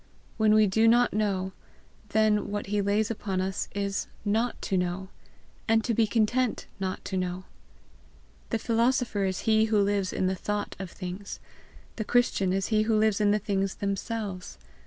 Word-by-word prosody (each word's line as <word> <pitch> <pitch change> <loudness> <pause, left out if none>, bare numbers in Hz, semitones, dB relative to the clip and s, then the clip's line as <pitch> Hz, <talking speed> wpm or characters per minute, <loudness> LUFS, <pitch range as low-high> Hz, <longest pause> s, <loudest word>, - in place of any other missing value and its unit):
When 215 -1 +4
we 215 0 +6
do 220 +3 +3
not 240 +2 +4
know, 195 -3 0 0.6
then 210 0 +2
what 205 0 -3
he 205 - +2
lays 205 +2 +1
upon 195 -4 -3
us 190 0 -2
is 200 -1 -2 0.2
NOT 225 +4 0
TO 195 - -2
KNOW, 180 +1 -1 0.6
and 225 0 +3
to 235 - 0
be 225 0 +3
content 230 +3 +1
not 190 0 -3
to 190 - -3
know. 180 0 -2 1.1
The 230 - 0
philosopher 230 -2 +1
is 190 -1 -2
he 220 -1 +3
who 215 -1 +2
lives 200 -2 +1
in - - -1
the 185 - +1
thought 205 +2 -3
of 190 -2 -5
things, 185 +2 -7 0.6
the 220 - -1
Christian 215 -5 +2
is 190 0 -1
he 215 -1 +3
who 220 0 +2
lives 215 -1 +2
in 205 - +4
the 210 - +4
things 195 -2 -1
themselves. 200 - -4
205 Hz, 175 wpm, -27 LUFS, 190-220 Hz, 1.1 s, we